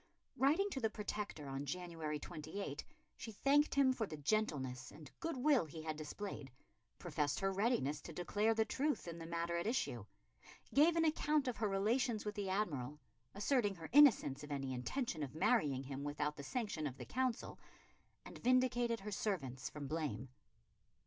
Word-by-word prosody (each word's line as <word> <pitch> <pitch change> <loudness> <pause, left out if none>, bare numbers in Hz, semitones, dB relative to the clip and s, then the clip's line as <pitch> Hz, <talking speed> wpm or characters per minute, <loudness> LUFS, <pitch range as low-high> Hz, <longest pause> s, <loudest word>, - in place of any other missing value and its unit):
Writing 305 +9 +3
to 270 - -2
the 225 -3 +1
Protector 210 -8 -4
on 135 +1 -3
January 160 0 -3
28, 155 +1 -5 0.3
she 225 - -6
thanked 280 +8 +3
him 270 -2 +5
for 225 -4 -2
the 155 - -6
gentleness 140 -7 -1
and 150 -4 -12
good 330 -4 -2
will 270 - +4
he 155 +1 -8
had 155 -1 -2
displayed; 155 -1 -6 0.5
professed 150 -4 -1
her 195 0 +1
readiness 190 - +1
to - - -8
declare 205 +7 +1
the 220 0 +3
truth 290 -4 -1
in 170 0 -5
the 165 - -7
matter 170 0 -1
at 170 - -1
issue; 170 - 0 0.7
gave 315 +4 +6
an 330 -1 +3
account 305 -2 +2
of 245 - -1
her 215 - +1
relations 220 +4 +1
with 210 - -2
the 200 -2 -3
Admiral, 150 -8 -1 0.4
asserting 205 -1 +2
her 165 -2 -8
innocence 230 - +6
of 150 - -8
any 135 -2 -2
intention 160 - -2
of 145 0 -4
marrying 155 - +2
him 135 +1 -5
without 150 +1 -1
the 145 - -7
sanction 190 - -2
of 135 -1 -7
the - - -7
Council; 255 -2 -1 0.7
and - - -10
vindicated 245 -2 +2
her 210 +2 -5
servants 135 - -2
from 150 -1 -6
blame. 135 -5 -3
190 Hz, 175 wpm, -38 LUFS, 150-240 Hz, 0.7 s, gave